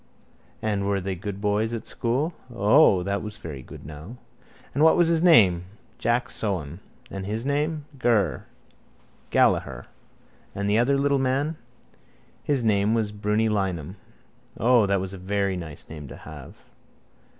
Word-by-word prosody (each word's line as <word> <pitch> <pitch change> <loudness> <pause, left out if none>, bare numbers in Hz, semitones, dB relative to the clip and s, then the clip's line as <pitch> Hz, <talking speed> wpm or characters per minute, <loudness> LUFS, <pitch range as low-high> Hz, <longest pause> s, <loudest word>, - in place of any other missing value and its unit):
And 100 -2 0
were 100 -1 +1
they 95 +1 -3
good 95 +2 -6
boys 105 +3 0
at 115 - -6
school? 135 +8 -1 0.2
O. 105 - +5
That 100 +1 -1
was 105 -1 -7
very 75 -5 -7
good - - -12
now. 80 - -9 0.6
And 145 - +2
what 160 - +6
was 175 -1 +4
his 165 -1 +2
name? 100 - +5 0.3
Jack 120 +1 +1
Sohan. 85 -6 -3 0.3
And 95 -1 -5
his 110 +4 -3
name? 150 +2 -1
Ger. 110 - +1 0.8
Gallaher. - - +2 0.7
And 100 0 -2
the 105 +2 +3
other 135 +4 +3
little 140 0 +2
man? 135 +4 0 0.9
His 140 -4 +1
name 105 0 +2
was 110 -2 0
Brunny 105 +2 0
Lynam. 95 -6 -1 0.6
O, 120 -2 +4
that 100 0 +2
was 95 0 -5
a 95 - -8
very 100 +1 -1
nice 80 -5 -7
name 75 -3 -9
to - - -9
have. 75 -4 -11
105 Hz, 150 wpm, -25 LUFS, 95-125 Hz, 0.9 s, what